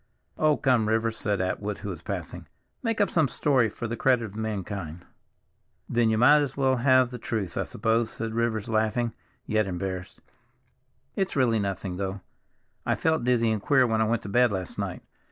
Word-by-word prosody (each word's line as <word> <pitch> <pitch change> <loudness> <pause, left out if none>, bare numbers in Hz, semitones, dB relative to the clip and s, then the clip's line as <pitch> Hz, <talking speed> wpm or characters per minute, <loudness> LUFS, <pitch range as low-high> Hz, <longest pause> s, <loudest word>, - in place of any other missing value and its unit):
"Oh, 155 -1 +3
come, 125 -5 +2
Rivers," 110 0 +1
said 105 -3 -1
Atwood, 100 +2 -2
who - - -3
was 90 -5 -6
passing, - - -6 0.3
"make 225 -2 -1
up 205 -3 +2
some 160 -4 +3
story, 130 -3 +2
for 115 - -5
the 115 - -3
credit 125 -2 +2
of 105 -2 -10
mankind." 100 -6 -4 0.8
"Then 115 -1 +2
you 110 - +2
might 145 +6 +6
as 140 -2 -3
well 130 -1 +2
have 130 0 +4
the 125 - -6
truth, 100 -6 -3
I - - -1
suppose," 115 0 0
said 115 0 -5
Rivers, 115 -2 -1
laughing, 110 +1 0 0.3
yet 110 -1 +1
embarrassed. 95 0 -5 1.0
"It's 190 -1 -1
really 120 -5 +3
nothing, 95 -2 -3
though; 95 0 -3 0.6
I - - +1
felt 160 -3 +1
dizzy 120 -2 +2
and 110 -2 -1
queer 130 +2 +4
when 110 -2 +1
I - - +3
went 115 0 0
to - - -6
bed 120 +2 +4
last 95 -3 -4
night. - - -4
115 Hz, 190 wpm, -26 LUFS, 100-125 Hz, 1.0 s, might